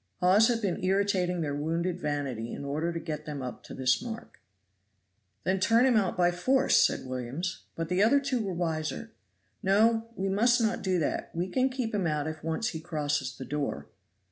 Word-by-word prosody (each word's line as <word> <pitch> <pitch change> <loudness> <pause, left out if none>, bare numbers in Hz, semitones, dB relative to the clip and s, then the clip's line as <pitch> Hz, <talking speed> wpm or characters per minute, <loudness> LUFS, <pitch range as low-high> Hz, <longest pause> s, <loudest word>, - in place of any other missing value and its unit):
Hawes 195 +5 +5
had 235 -2 0
been 185 -3 -1
irritating 185 -2 +1
their 145 -3 -1
wounded 165 +5 -1
vanity 140 -7 -3
in 140 - -6
order 155 +4 -1
to 170 - -3
get 155 -1 -5
them 145 -3 -4
up 125 - -6
to - - -9
this 130 +4 +2
mark. 235 -1 -8 1.0
"Then 190 +1 +1
turn 230 +6 +4
him 255 -3 +4
out 195 -4 +1
by 175 -1 +4
force," 260 +10 +3
said - - +1
Williams. 130 +8 -4
But 165 0 -3
the 180 +3 +1
other 240 +7 +5
two 265 -4 -1
were 195 - -3
wiser. 170 +5 -3 0.5
"No, 225 +4 +3
we 195 - -2
must 230 +6 +3
not 225 -1 0
do 185 -1 +1
that 160 - -1
we 175 +2 -1
can 260 +6 +2
keep 255 -4 -3
him 195 -4 +1
out 150 -2 -1
if 155 0 -5
once 165 +8 -1
he 160 - -5
crosses 145 -5 -2
the 130 - -6
door." 145 -1 -3
180 Hz, 195 wpm, -29 LUFS, 150-220 Hz, 1.0 s, Hawes